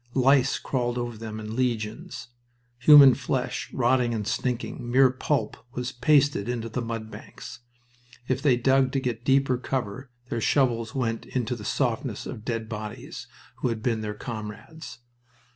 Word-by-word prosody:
Lice 135 0 +4
crawled 120 -2 -2
over 120 -1 -3
them 110 0 -7
in 110 +1 -6
legions. 115 -1 -3 0.5
Human 140 0 +9
flesh, 125 -1 -3
rotting 125 -1 +2
and 105 -2 -3
stinking, 125 0 -3
mere 130 +1 +5
pulp, 130 -3 -1 0.2
was 125 +1 -3
pasted 135 -4 +2
into 115 -2 -3
the 120 +3 -3
mud 115 -1 -5
banks. - - -10 0.7
If 130 +1 0
they 135 -4 +4
dug 130 +1 +3
to 135 - +1
get 120 -3 -3
deeper 135 -1 +2
cover 130 -1 -4 0.2
their 115 - -2
shovels 115 -3 +1
went 115 -3 -2
into 125 -1 -2
the 110 - -9
softness - - -1
of 105 - -7
dead 115 -2 -3
bodies 105 -1 -7 0.3
who - - -1
had 115 -2 -3
been 115 -3 0
their 105 -1 -4
comrades. 115 +8 -8
120 Hz, 155 wpm, -26 LUFS, 115-130 Hz, 0.7 s, Human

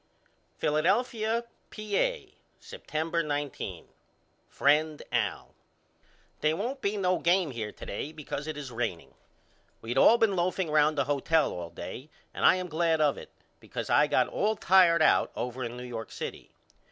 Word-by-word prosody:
Philadelphia, 220 +8 +1 0.3
Pa., 215 - 0 0.5
September 170 - -3
19. 145 -3 -4 0.6
FRIEND 150 +1 +2
AL: - - -2 0.9
They 155 +1 +1
won't 250 +9 -4
be 205 -2 -1
no 185 -2 +1
game 175 -2 +2
here 110 -4 -5
to - - -11
day 140 +9 -5
because 150 -1 -6
it 155 -1 -4
is 140 -3 -7
raining. 115 -8 -4 0.7
We 115 +2 -5
all 220 - +6
been 220 -4 +2
loafing 180 -1 -1
round 150 0 +3
the 140 - +3
hotel 145 +3 +1
all 85 -1 -6
day 130 - -8 0.2
and - - -5
I - - +6
am 185 -1 -3
glad 165 0 +1
of 150 -2 +3
it - - -10 0.3
because - - -6
I - - +5
got - - +2
all 215 +2 0
tired 180 -4 +5
out - - +3
over 125 +1 -4
in 120 +1 -5
New 125 - -7
York 115 -2 -7
City. - - -7
155 Hz, 155 wpm, -28 LUFS, 140-190 Hz, 0.9 s, all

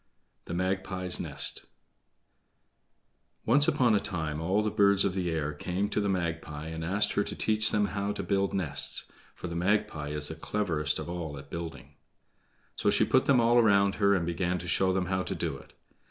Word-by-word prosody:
The 85 - -5
Magpie's 95 0 -1
Nest - - -2 1.8
Once 145 +6 +4
upon 125 -6 +3
a 105 - +4
time 80 -6 -3
all 95 +6 +1
the 105 - -1
birds 100 -2 +4
of 95 - 0
the 90 -2 -1
air 75 -2 -2
came 90 +7 -2
to 105 - 0
the 100 - 0
Magpie 80 -4 -3
and 80 0 -5
asked 100 +5 +1
her 105 - +1
to - - -5
teach 110 0 +2
them 105 -1 +2
how 100 0 -2
to - - -4
build 100 -1 0
nests, 75 -6 0 0.3
for - - -9
the 85 - -6
Magpie 85 -5 0
is 75 0 +1
the - - -4
cleverest 80 -4 -1
of - - -6
all 85 -4 -5
at 70 +1 -12
building. 80 -4 -7 0.8
So - - +1
she - - +3
put - - +3
them 135 -3 +4
all 120 +1 +4
around 100 -3 +4
her 100 0 +5
and 85 -3 0
began 85 +1 -1
to 90 0 -7
show 95 +2 +2
them 95 -1 0
how 95 +1 -1
to 95 - -4
do 85 -4 -3
it. - - -17
90 Hz, 195 wpm, -29 LUFS, 80-100 Hz, 1.8 s, her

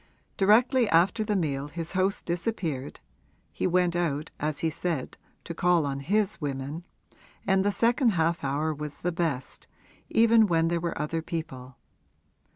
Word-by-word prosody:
Directly 230 +4 +4
after 190 +7 +3
the 210 -1 -1
meal 145 -6 -1
his 165 +2 -6
host 190 +1 0
disappeared 170 - -3 0.5
(he - - -1
went 180 -1 +2
out, 155 -3 -1
as 150 -1 -2
he 160 - +1
said, 160 -4 -3 0.3
to 170 - -6
call 175 -1 +2
on 140 -1 -3
his 205 +7 0
women) 145 +3 -4 0.6
and 190 -1 +3
the 205 - +2
second 235 +2 +2
half 165 -1 0
hour 145 +3 0
was 150 -1 -7
the 175 - 0
best, 160 -7 -3 0.4
even 225 -1 +5
when 165 -2 +2
there 170 0 -1
were 170 -3 -3
other 155 +2 -2
people. 135 -6 -6
170 Hz, 155 wpm, -27 LUFS, 150-195 Hz, 0.6 s, even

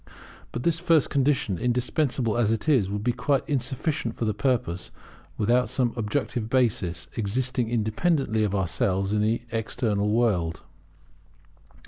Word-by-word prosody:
But - - -4
this 170 -1 +1
first 165 -4 +3
condition, 135 - +1
indispensable 125 -1 0
as 120 -3 +2
it 115 +6 -1
is, 125 -11 +3
would 105 +1 -3
be 120 - +2
quite 135 +3 0
insufficient 140 +3 -2
for 115 - -2
the 110 - +1
purpose, 105 -7 -1 0.5
without 120 +4 +2
some 125 -3 0
objective 115 0 -2
basis, 95 -9 0
existing 120 +2 -1
independently 115 +1 +1
of 100 -1 0
ourselves 95 +1 0
in 105 - +2
the 110 +2 +1
external 110 -2 -1
world. 105 -8 +1
115 Hz, 135 wpm, -26 LUFS, 105-130 Hz, 0.5 s, first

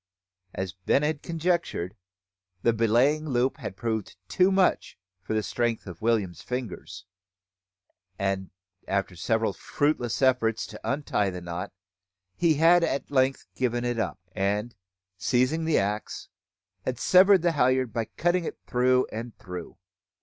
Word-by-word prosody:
As 95 -3 -3
Ben 95 - +1
had 150 -1 -1
conjectured, 165 - -1 0.7
the 115 - +4
belaying 125 +8 +2
loop 125 0 +1
had 95 - -7
proved 110 -3 -3
too 185 +1 +3
much 190 -1 +2 0.2
for 105 +4 -3
the 110 - +1
strength 120 0 -1
of 90 -4 -9
William's 110 -6 0
fingers; 125 -5 -6 1.1
and, 95 -1 -1 0.4
after 95 -2 -1
several 110 +4 0
fruitless 125 +1 -1
efforts 115 -4 +2
to - - -10
untie 135 -8 0
the 90 -1 -5
knot, 85 +2 -5 0.6
he 165 -3 +3
had 170 +3 +5
at 140 -4 -1
length 130 -1 +2
given 120 -1 -1
it 120 -1 -1
up, 95 -4 -2
and, 105 +5 -1 0.5
seizing 130 - +1
the 160 - +3
axe, 105 +2 -2 0.5
had 125 -2 -2
severed 185 +5 +6
the 175 - +3
halliard 130 -5 +2
by 115 -1 -1
cutting 175 +8 0
it - - -5
through 125 0 +3
and 115 +1 -6
through. 90 -2 -8
120 Hz, 140 wpm, -27 LUFS, 105-145 Hz, 1.1 s, severed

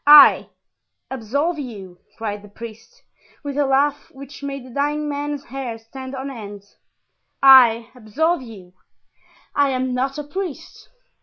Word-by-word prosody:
"I, 295 0 +9 0.6
absolve 280 +7 -1
you!" 195 -9 -8 0.2
cried 210 -2 -4
the 205 - -13
priest, 230 - -12 0.4
with 285 -1 -4
a 290 -1 +1
laugh 280 +2 +1
which 275 +1 -12
made 275 -2 -5
the 255 - -12
dying 295 +3 -1
man's 290 0 -3
hair 255 -3 -6
stand 260 +4 -9
on 270 +1 -5
end; 205 -5 -9 0.8
"I, 245 -4 +7
absolve 275 +9 -1
you? 200 -7 -12 0.8
I 285 -1 +3
am 255 -1 -1
not 265 +2 -1
a 295 - -4
priest." 335 +1 -7
265 Hz, 140 wpm, -21 LUFS, 230-285 Hz, 0.8 s, I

